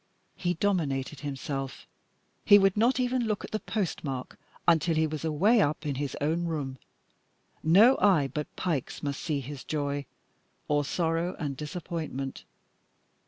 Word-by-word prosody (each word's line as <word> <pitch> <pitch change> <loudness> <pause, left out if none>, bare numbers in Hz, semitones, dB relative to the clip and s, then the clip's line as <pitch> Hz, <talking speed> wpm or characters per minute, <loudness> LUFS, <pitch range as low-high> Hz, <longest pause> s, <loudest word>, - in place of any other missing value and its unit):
He 175 -1 -1
dominated 150 -7 0
himself; 135 -1 -4 0.6
he 205 - +8
would 195 -1 +4
not 240 +5 +3
even 250 -1 +1
look 215 -2 -1
at - - -12
the 215 - -1
postmark 155 - -3 0.3
until 165 0 +4
he 160 0 +3
was 155 -1 -4
away 190 +9 +4
up 155 -1 0
in 145 - 0
his 140 0 -3
own 160 +4 0
room. 140 -6 -3 0.8
No 205 +11 +6
eye 180 -9 +4
but 150 +3 -4
Pike's 160 -8 -2
must 140 -1 -2
see 150 -4 -1
his 140 +1 -7
joy 145 -2 -2 0.6
or 145 0 +2
sorrow 165 +3 -1
and 145 -4 -3
disappointment. 150 -3 -5
155 Hz, 145 wpm, -28 LUFS, 140-180 Hz, 0.8 s, he